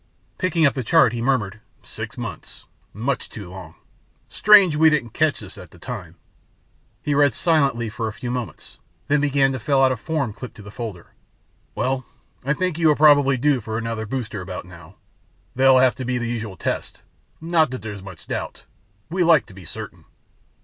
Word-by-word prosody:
Picking 175 Hz, -4 st, +2 dB
up 140 Hz, -, +4 dB
the 130 Hz, -, -3 dB
chart, 125 Hz, -3 st, +4 dB
he 120 Hz, -, -3 dB
murmured, 115 Hz, -5 st, 0 dB, 0.2 s
"Six -, -, -7 dB
months... -, -, -8 dB, 0.3 s
much 125 Hz, +6 st, -3 dB
too 100 Hz, -6 st, -9 dB
long. 90 Hz, -3 st, -10 dB, 0.5 s
Strange 200 Hz, -6 st, +6 dB
we 160 Hz, +1 st, +6 dB
didn't 140 Hz, -7 st, 0 dB
catch 155 Hz, +1 st, +1 dB
that 100 Hz, -2 st, -9 dB
at 90 Hz, -3 st, -11 dB
the 90 Hz, -, -17 dB
time." 90 Hz, -4 st, -7 dB, 0.9 s
He 145 Hz, -, 0 dB
read 145 Hz, -3 st, +3 dB
silently 140 Hz, -8 st, +2 dB
for 110 Hz, +1 st, -4 dB
a -, -, -3 dB
few 120 Hz, +4 st, -5 dB
moments, 125 Hz, -3 st, -6 dB, 0.3 s
then 145 Hz, 0 st, +2 dB
began 140 Hz, -2 st, +3 dB
to 130 Hz, -, -3 dB
fill 135 Hz, +3 st, +2 dB
out 130 Hz, -, +5 dB
a -, -, 0 dB
form 130 Hz, 0 st, -2 dB
clipped 125 Hz, +3 st, -9 dB
to 105 Hz, -, -12 dB
the 105 Hz, -, -10 dB
folder. 105 Hz, -7 st, -7 dB, 0.6 s
"Well, 130 Hz, 0 st, -1 dB, 0.4 s
I 140 Hz, +2 st, +1 dB
think 180 Hz, -1 st, -1 dB
you 155 Hz, -3 st, +4 dB
probably 145 Hz, -2 st, +5 dB
are -, -, -3 dB
due 135 Hz, 0 st, +2 dB
for 110 Hz, +1 st, -4 dB
another 115 Hz, -1 st, -3 dB
booster 110 Hz, -5 st, -4 dB
about 90 Hz, -1 st, -6 dB
now. 90 Hz, -1 st, -14 dB, 0.6 s
There'll 130 Hz, +1 st, +5 dB
have 130 Hz, -1 st, +5 dB
to 130 Hz, -, -4 dB
be 125 Hz, 0 st, -1 dB
the 120 Hz, -1 st, -2 dB
usual 110 Hz, -5 st, -4 dB
tests. -, -, -4 dB, 0.4 s
Not 160 Hz, -2 st, +2 dB
that 130 Hz, -2 st, -6 dB
there's 105 Hz, -3 st, -6 dB
much 95 Hz, -4 st, -11 dB
doubt... -, -, -5 dB, 0.5 s
we 180 Hz, +1 st, +1 dB
like 165 Hz, -4 st, +5 dB
to -, -, -15 dB
be 95 Hz, -2 st, -12 dB
certain." -, -, -8 dB
125 Hz, 190 wpm, -22 LUFS, 110-145 Hz, 0.9 s, Strange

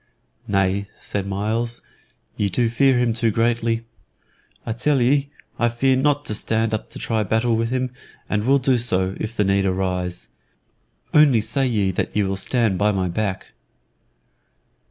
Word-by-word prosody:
"Nay," 100 Hz, 0 st, +1 dB
said 100 Hz, -1 st, -4 dB
Myles; 110 Hz, +4 st, -2 dB, 0.5 s
"ye 100 Hz, -, 0 dB
do 120 Hz, +3 st, +1 dB
fear 130 Hz, +2 st, +3 dB
him 120 Hz, -2 st, +2 dB
too 115 Hz, 0 st, +1 dB
greatly. 115 Hz, +1 st, 0 dB, 0.8 s
I 115 Hz, -, -3 dB
tell 135 Hz, +5 st, +1 dB
ye 140 Hz, +3 st, +2 dB, 0.3 s
I 120 Hz, -, +3 dB
fear 130 Hz, +3 st, +2 dB
not 145 Hz, +2 st, +1 dB
to -, -, -2 dB
stand 110 Hz, +1 st, 0 dB
up 110 Hz, -, -3 dB
to -, -, -8 dB
try 110 Hz, -2 st, -1 dB
battle 110 Hz, +3 st, +1 dB
with 115 Hz, 0 st, 0 dB
him 130 Hz, 0 st, -1 dB, 0.4 s
and 105 Hz, 0 st, -1 dB
will 140 Hz, +1 st, +5 dB
do 130 Hz, -2 st, +2 dB
so, 95 Hz, -5 st, 0 dB
too, -, -, -11 dB
if 110 Hz, +2 st, -4 dB
the 105 Hz, -, +3 dB
need 100 Hz, 0 st, +2 dB
arise. 90 Hz, -1 st, -2 dB, 0.9 s
Only 145 Hz, -6 st, +6 dB
say 135 Hz, +5 st, 0 dB
ye 105 Hz, -6 st, +1 dB
that -, -, -3 dB
ye 105 Hz, -, +3 dB
will 95 Hz, 0 st, -1 dB
stand 110 Hz, -1 st, 0 dB
by 105 Hz, +1 st, +3 dB
my 95 Hz, -2 st, -1 dB
back." 95 Hz, +1 st, -3 dB
115 Hz, 170 wpm, -22 LUFS, 100-120 Hz, 0.9 s, Only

